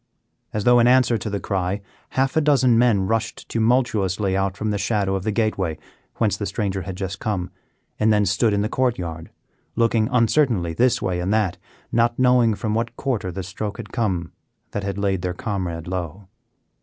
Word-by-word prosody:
As 105 - -2
though 120 +2 +6
in 120 - +5
answer 125 -1 +4
to 100 - -4
the 100 0 -2
cry, 95 0 -1 0.4
half 135 0 +2
a 160 - +4
dozen 135 -5 +4
men 115 -5 +3
rushed 115 +2 -2
tumultuously 110 -5 +1
out 95 0 -1
from 110 0 -1
the 100 - -1
shadow 100 -3 0
of 95 - -1
the 110 +4 -1
gateway 100 -7 0 0.4
whence - - +1
the - - -3
stranger 95 -2 -2
had 95 +1 -6
just 95 0 -4
come, 95 -5 -2 0.5
and 110 +1 +4
then 105 -1 +3
stood 100 +4 +2
in 100 0 +1
the - - 0
court 125 +1 0
yard, 85 -2 -6 0.5
looking 115 -1 +2
uncertainly 115 - +2
this 125 +8 +2
way 90 -1 -1
and 90 +3 -1
that, 105 -5 0 0.3
not 120 0 +2
knowing 125 -3 +4
from 105 +1 -2
what 115 +1 -2
quarter 115 -10 -2
the 95 +2 -5
stroke 100 +3 -5
had 110 -3 -9
come 95 -8 -1 0.4
that 105 - -3
had 100 0 -3
laid 100 -2 0
their 90 0 -3
comrade 90 - -4
low. 90 +1 -5
105 Hz, 195 wpm, -22 LUFS, 95-115 Hz, 0.5 s, though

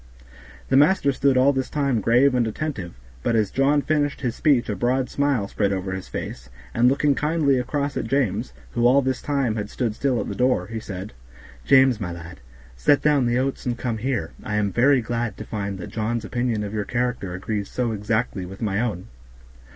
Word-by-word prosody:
The 135 - +4
master 150 0 +4
stood 135 0 +2
all 135 +2 +5
this 130 -1 -2
time 140 -6 0
grave 125 +6 +4
and 120 -2 +2
attentive, 110 - -4 0.3
but 115 - 0
as 105 -3 +1
John 140 +2 +2
finished 145 -2 0
his 120 -4 -2
speech 140 -6 +2
a 105 - -2
broad 125 +5 0
smile 140 -8 +1
spread 100 0 0
over 95 -1 -2
his 95 0 -5
face, 65 +1 -6 0.2
and 120 +1 +4
looking 140 +2 +2
kindly 150 -2 +1
across 140 +2 -2
at - - -2
James, 115 -4 0 0.2
who 120 0 +2
all 135 +3 +5
this 130 -1 -1
time 135 -6 0
had 105 -1 -3
stood 120 -4 -2
still 130 +1 0
at - - -3
the - - -3
door, 125 -7 +1
he 110 +3 -5
said, 100 -1 -7 0.5
"James, 130 -4 +5
my 90 -3 -3
lad, 85 0 -9 0.4
set 135 - +3
down 145 -5 +3
the 120 +1 +1
oats 130 0 -2
and 120 -1 -1
come 115 -3 -3
here; 120 -9 -2
I 105 - -3
am 105 -1 +1
very 130 +5 +4
glad 115 -2 -3
to 110 - -7
find 100 -2 -4
that 90 - -8
John's 115 +1 -2
opinion 120 -3 -1
of 100 0 -5
your 105 -1 -1
character 120 -5 -2
agrees 100 +2 -3
so 125 -2 -1
exactly 110 -1 -1
with 95 +2 -9
my 105 -2 -1
own. 105 -7 -3
120 Hz, 205 wpm, -23 LUFS, 105-135 Hz, 0.5 s, all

